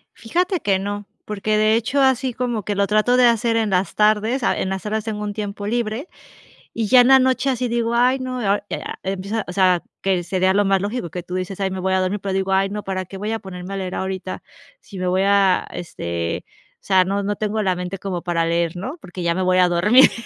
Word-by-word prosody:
Fíjate 355 - -1
que 195 -7 +1
no, 205 +1 -4 0.2
porque 210 +1 -1
de 215 +1 +4
hecho, 235 +5 +1
así 260 -1 +2
como 240 -3 -2
que 205 +2 -2
lo 200 0 +2
trato 215 +4 +3
de 250 - +6
hacer 230 0 +2
en 225 -2 +1
las 185 0 0
tardes, 215 +4 +2
ah, - - +1
en 190 - -1
las 190 +1 -4
horas 215 +1 -2
tengo 210 -1 -3
un 205 - -3
tiempo 205 -1 -5
libre 235 +6 -2 0.6
y 225 -2 -1
ya 250 +1 +7
en 245 - +4
la 265 0 +7
noche 260 +1 +2
así 250 -1 0
digo: 235 0 0
"Ay, 250 +2 +3
no", 255 -1 -4 0.3
eh, - - -4
ah, - - -6
empieza, 195 +3 -3
o 180 - -6
sea, 185 -2 +3 0.2
que 185 -2 +1
sería 185 +1 +1
lo 205 +1 +3
más 195 -1 +2
lógico 205 -3 -3
que 175 +2 -6
tú 180 +1 -6
dices: 185 +1 -4
"Ay, 190 - 0
me 190 - -4
voy 190 +1 0
a 190 - +3
dormir", 185 +3 -1
pero 195 0 -3
digo: 190 0 -1
"Ay, 195 +1 +2
no, 210 +1 -5
para 185 -1 -3
qué 195 +2 -9
voy 210 +3 -3
a 225 - -2
ponerme 190 -1 -8
a - - -3
leer 185 -1 -4
ahorita 190 0 -4 0.4
si 195 -3 -10
me 185 - -1
voy 185 +1 +2
a 200 -2 +3
este, 85 - -4 0.4
o - - -45
sea, 190 -2 +5
no 200 +1 -1
no 205 +1 -1
tengo 215 0 -1
la 185 -2 +1
mente 180 +2 -5
como 185 -2 -4
para 170 -1 0
leer", 170 0 0
¿no?, 255 - -5
porque 180 0 -7
ya 170 - +2
me 185 - -1
voy 185 0 +2
a 180 -1 +5
dormir, 210 +10 +6
200 Hz, 250 wpm, -21 LUFS, 185-225 Hz, 0.6 s, ya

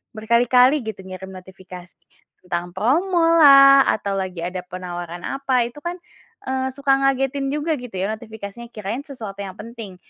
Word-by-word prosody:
berkali-kali 245 +4 +4
gitu 215 -3 -5
ngirim 190 0 -8
notifikasi. 185 -1 -12 0.5
Tentang 175 0 -4
promolah, 290 - +6
atau 200 -2 -4
lagi 185 -2 -5
ada 180 +1 -4
penawaran 175 -1 -7
apa 270 -2 0
itu 240 +5 -12
kan, 345 +4 -4 0.5
eee, 260 0 -1
suka 280 0 0
ngagetin 275 0 0
juga 300 +2 -1
gitu 245 -5 -10
ya - - 0
notifikasinya 220 0 -10
kirain 215 +6 -5
sesuatu 220 -8 -8
yang 190 -1 -9
penting. 225 -3 -9
235 Hz, 145 wpm, -21 LUFS, 190-275 Hz, 0.5 s, promolah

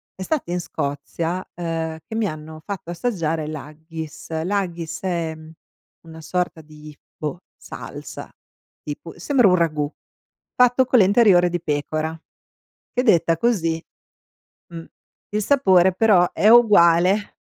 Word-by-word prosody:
è 190 - -6
stato 275 - -2
in 180 +1 -1
Scozia, 165 +4 -4
ehm, 165 -2 -4
che 220 - -6
mi 225 - 0
hanno 155 -2 -6
fatto 195 -4 -6
assaggiare 165 -5 -2
l'haggis. 155 +1 -8
L'haggis 175 -4 -3
è 165 -3 -2 0.7
una 160 0 -11
sorta 180 +1 -2
di, 150 -1 -14 0.2
boh, 155 +3 -5
salsa - - -9 0.5
tipo, 150 +2 -8
sembra 250 +4 +3
un 180 - +5
ragù 155 -4 0 0.6
fatto 250 +1 +4
con 250 -1 +4
le 195 - +6
interiora 195 -3 +5
di 175 0 -2
pecora 155 +1 -2 0.8
che 250 - +1
detta 170 -7 +3
così 165 -8 0 0.9
mh. 165 -1 -8 0.5
Il 210 0 -1
sapore 190 -9 +4
però 190 -4 +4
è 210 - +2
uguale 200 -4 +5
170 Hz, 125 wpm, -22 LUFS, 160-200 Hz, 0.9 s, le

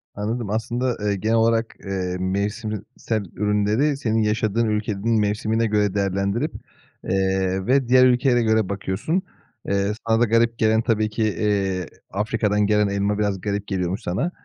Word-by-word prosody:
Anladım. 110 +1 -3
Aslında, 120 +3 -1
eee, 105 -1 0
genel 110 +4 0
olarak, 115 0 +2
eee, 95 -2 -2
mevsim 100 +4 -2
iii, 105 -3 -4 0.2
sel 110 -3 -2
ürünleri 105 +8 +1
senin 110 -5 0
yaşadığın 110 +1 +1
ülkenin 105 +1 0
mevsimine 105 +2 0
göre 105 -2 +1
değerlendirip, 100 - 0 0.5
eee, 95 0 0
ve 130 0 +2
diğer 130 0 +6
ülkelere 125 0 +3
göre 110 -3 +2
bakıyorsun. 100 - -1 0.5
Eee, 100 +1 +1 0.2
sana 115 0 +3
da - - +6
garip 115 +1 +2
gelen 110 0 +3
tabii 110 -2 +1
ki, 110 +1 -2
eee, 100 -2 0 0.3
Afrika'dan 105 0 0
gelen 105 -1 +3
elma 100 +1 -1
biraz 100 -3 -1
garip 100 0 -3
geliyormuş 95 0 -2
sana. 125 - -2
105 Hz, 155 wpm, -22 LUFS, 100-115 Hz, 0.5 s, diğer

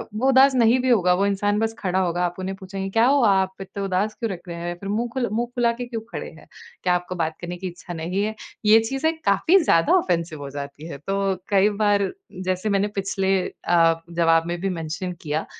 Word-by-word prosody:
वो 255 +5 +1
उदास 265 +1 +6
नहीं 240 +1 +4
भी 255 - 0
होगा, 180 -6 +4
वो 195 +2 +1
इंसान 205 +1 +1
बस 225 0 0
खड़ा 185 -1 0
होगा, 175 -1 0
आप 175 0 -3
उन्हें 190 +1 -3
पूछेंगे, 195 0 -5
"क्या 225 +3 +3
हुआ? 270 -6 +4
आप 190 0 -5
इतने 195 +1 -6
उदास 195 +3 0
क्यों 230 -3 -3
लग 180 - -5
रहे 170 -1 -6
हैं? 175 +1 -4
फिर 200 - -6
मुँह 230 +4 0
खुल 260 -2 0
मुँह 235 +2 0
फुला 235 -1 +3
के 245 +1 -5
क्यों 230 -2 -5
खड़े - - -5
हैं? - - -17 0.4
क्या 180 - +3
आपको 180 +1 -4
बात 160 -2 -2
करने 175 0 -5
की 185 +1 -5
इच्छा 175 0 -8
नहीं 175 +5 -2
है?" 220 +1 -2 0.3
ये 220 +1 +7
चीज़ें 270 +8 -1
काफ़ी 200 - +4
ज़्यादा 165 - +3
ऑफ़ेंसिव 170 - -1
हो 140 - -6
जाती 140 +3 -7
हैं। 140 - -8
तो 195 - 0 0.3
कई 200 0 +4
बार, 205 -1 +2 0.4
जैसे 185 +3 -1
मैंने 200 0 +2
पिछले 195 0 0
अ, 165 -1 +2
जवाब 165 -1 +3
में 175 0 -3
भी 195 - 0
मेंशन 165 +3 -4
किया 155 0 -2
195 Hz, 225 wpm, -23 LUFS, 175-220 Hz, 0.4 s, ये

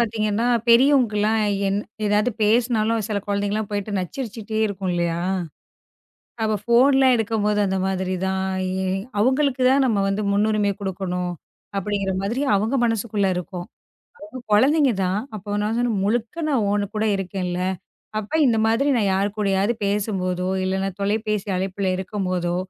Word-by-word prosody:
பாத்தீங்கன்னா, 220 0 0 0.2
பெரியவங்களுக்கு 245 -3 +5
எல்லாம் 220 +1 +2 0.3
என் 200 +1 0 0.3
எதாவது 210 +4 +2
பேசினாலும் 225 -1 +2
சில 205 -2 -1
குழந்தைகள்லாம் 205 +1 -1
போயிட்டு 205 0 -3
நச்சரிச்சுக்கிட்டே 220 +2 -4
இருக்கும் 195 -2 -3
இல்லையா? 170 -1 -1 1.2
அப்ப 215 -1 +1
ஃபோன்ல்லாம் 260 +2 +5
எடுக்கும்போது 210 -2 0
அந்த 190 0 -1
மாதிரி 190 -1 -1
தான், 190 0 -1 0.3
இ - - -2 0.5
"அவுங்களுக்கு 260 +2 +2
தான் 275 +1 +4
நாம 210 -5 +1
வந்து 195 +2 -1
முன்னுரிமை 210 0 +2
குடுக்கணும்" 180 -2 -3 0.5
அப்படிங்கிற 195 -1 -1
மாதிரி, 235 +8 -1
அவுங்க 220 +7 0
மனசுக்குள்ள 215 -3 0
இருக்கும். 180 0 -5 0.5
அவுங்க 305 -3 -9
கொழந்தைங்க 275 +4 +4
தான். 190 +3 0 0.2
அப்போ 205 0 -4
நான் 220 +2 -1
சொன்னேன், 240 -5 0
"முழுக்க 235 +9 -1
நான் 255 -7 +2
உன் 205 -1 -1
கூட 215 - 0
இருக்கேன்ல! 180 -1 -3 0.6
அப்ப 215 +8 -9
இந்த 230 -3 +3
மாதிரி 230 +6 +2
நான் 205 -4 +2
யார் 200 +2 +1
கூடயாது 200 +1 +1
பேசும்போதோ, 190 -3 -1 0.2
இல்லன்னா 190 +1 -1
தொலைபேசி 210 0 -1
அழைப்பில 190 +1 -2
இருக்கும்போதோ, 185 -2 -2
210 Hz, 135 wpm, -22 LUFS, 195-230 Hz, 1.2 s, பெரியவங்களுக்கு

